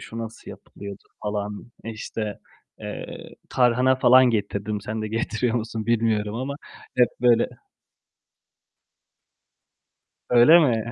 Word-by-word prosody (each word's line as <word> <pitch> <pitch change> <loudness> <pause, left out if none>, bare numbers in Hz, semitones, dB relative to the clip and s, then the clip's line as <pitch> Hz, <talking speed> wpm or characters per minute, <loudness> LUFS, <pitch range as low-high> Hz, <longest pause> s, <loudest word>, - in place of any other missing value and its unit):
şu 115 - -9
nasıl 115 0 -7
yapılıyordu?" 100 0 -10 0.2
falan. 105 +2 -4
İşte, 110 -1 -5 0.4
eee, - - -7 0.2
tarhana 125 +1 +3
falan 130 0 +6
getirdim. 105 -1 -2
Sen 110 +1 -4
de 110 - -3
getiriyor 115 +2 -1
musun 115 -1 -3
bilmiyorum 110 -2 +1
ama 130 +4 -3 0.4
hep 125 -1 +5
böyle 120 -2 +4 2.8
Öyle 125 +8 +7
mi? 120 -6 +1
115 Hz, 105 wpm, -24 LUFS, 105-120 Hz, 2.8 s, Öyle